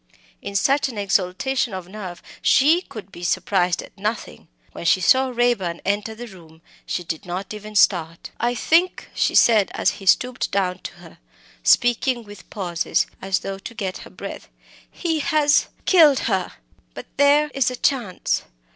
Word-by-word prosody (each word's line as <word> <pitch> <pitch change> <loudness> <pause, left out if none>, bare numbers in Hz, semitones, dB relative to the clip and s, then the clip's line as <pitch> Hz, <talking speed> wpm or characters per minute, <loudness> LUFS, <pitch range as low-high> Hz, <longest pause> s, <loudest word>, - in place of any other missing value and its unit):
In 200 - -7
such 275 +7 +2
an 235 - -9
exaltation 200 +4 0
of 185 -2 -7
nerve 185 -3 -8 0.2
she 310 +6 +4
could 215 - -11
be 175 - -11
surprised 180 0 0
at - - -15
nothing. 210 +2 -5 0.2
When - - -9
she 170 +2 +3
saw 260 +8 +4
Raeburn 235 -9 0
enter 205 +2 -1
the 240 +2 -8
room, 165 -6 -16 0.2
she 180 - -3
did 160 -2 -5
not 180 +4 -5
even 210 0 -9
start. 165 -5 +2
"I 240 +1 0
think," 335 +9 +1
she - - 0
said, 215 -4 +5
as - - +2
he 195 - -10
stooped 250 +6 +2
down 185 -2 -1
to - - -8
her 175 -3 -16 0.4
speaking 245 - +2
with 205 -1 -14
pauses, 180 -4 -1 0.2
as 190 0 -1
though 195 0 -5
to 230 - -9
get 195 -4 -4
her - - -11
breath - - -9 0.4
"he 325 -3 -2
has 295 0 +2 0.2
killed 310 -7 +5
her. 190 -5 -1 0.4
But - - -8
there 290 +2 +4
is 270 -2 +1
a 250 - -5
chance. 240 -7 -1
210 Hz, 165 wpm, -22 LUFS, 185-255 Hz, 0.4 s, said